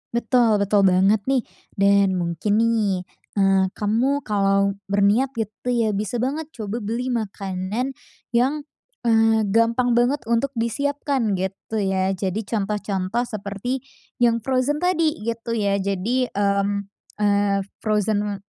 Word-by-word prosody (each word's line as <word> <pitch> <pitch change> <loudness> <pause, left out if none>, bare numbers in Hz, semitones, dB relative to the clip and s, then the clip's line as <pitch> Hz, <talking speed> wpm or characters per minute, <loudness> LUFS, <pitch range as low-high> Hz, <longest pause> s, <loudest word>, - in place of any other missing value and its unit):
Betul 235 -2 +3
betul 200 0 +3
banget 195 +2 +4
nih. 265 -1 +2 0.3
Dan 200 -2 +3
mungkin 170 +4 -1
nih, 220 -5 +1 0.4
eee, 195 -1 +4
kamu 235 +8 0
kalo 200 -1 +2 0.2
berniat 205 +6 +3
gitu 220 +3 -3
ya, 225 -4 +1
bisa 210 +4 -2
banget 290 +6 -2
coba 220 -1 -5
beli 230 +5 -2
makanan 210 +1 -3 0.4
yang, 280 +5 +1 0.4
eee, 225 -1 +4
gampang 230 +3 +2
banget 245 +5 +2
untuk 235 +4 +1
disiapkan 275 0 -1
gitu 195 +3 -3
ya. 190 -1 +1
Jadi 195 +3 -2
contoh-contoh 205 0 -2
seperti 215 +3 -4 0.4
yang 230 -2 +3
frozen 265 +5 0
tadi, 330 -4 +2
gitu 230 +1 -3
ya. 200 -2 +1
Jadi, 200 +7 0
mmm, 200 -1 0 0.2
eee, 205 -1 +2 0.2
frozen, 210 -2 0
215 Hz, 125 wpm, -22 LUFS, 200-240 Hz, 0.4 s, banget